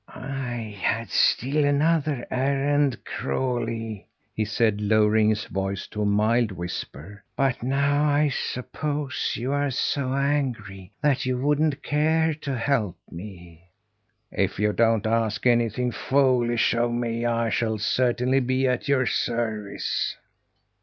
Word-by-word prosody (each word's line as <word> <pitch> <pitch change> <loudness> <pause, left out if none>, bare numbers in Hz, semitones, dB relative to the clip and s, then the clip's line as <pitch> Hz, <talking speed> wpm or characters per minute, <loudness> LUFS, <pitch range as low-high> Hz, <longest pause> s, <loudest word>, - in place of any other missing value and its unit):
"I 125 -5 -5
had 115 +5 -1
still 145 +4 +2
another 145 -2 +1
errand, 140 +1 +1
Crawlie," 115 - -3 0.3
he 110 - -1
said, 110 -1 +1
lowering 110 +1 +3
his 110 0 0
voice 95 0 -3
to 105 - -4
a 105 - +1
mild 110 +2 +2
whisper. 90 +1 -7
"But 135 -3 0
now 140 +3 +1
I 145 0 +3
suppose 145 +2 -3
you 125 +3 -3
are 145 0 +1
so 130 0 -1
angry 125 -10 -2
that 140 -3 +2
you 130 -1 0
wouldn't 145 +2 +1
care 160 +2 +2
to 140 -3 -3
help 115 -6 0
me?" 90 -2 -11 0.6
"If 100 -1 -1
you 105 +1 +1
don't 115 -2 +2
ask 110 0 0
anything 120 0 +2
foolish 120 -2 +2
of 120 0 +1
me, 120 0 -1
I 115 -1 0
shall 110 -2 0
certainly 125 +4 +1
be 130 +1 0
at 125 +2 -1
your 135 -2 +2
service." 110 -5 -2
120 Hz, 130 wpm, -25 LUFS, 110-140 Hz, 0.6 s, lowering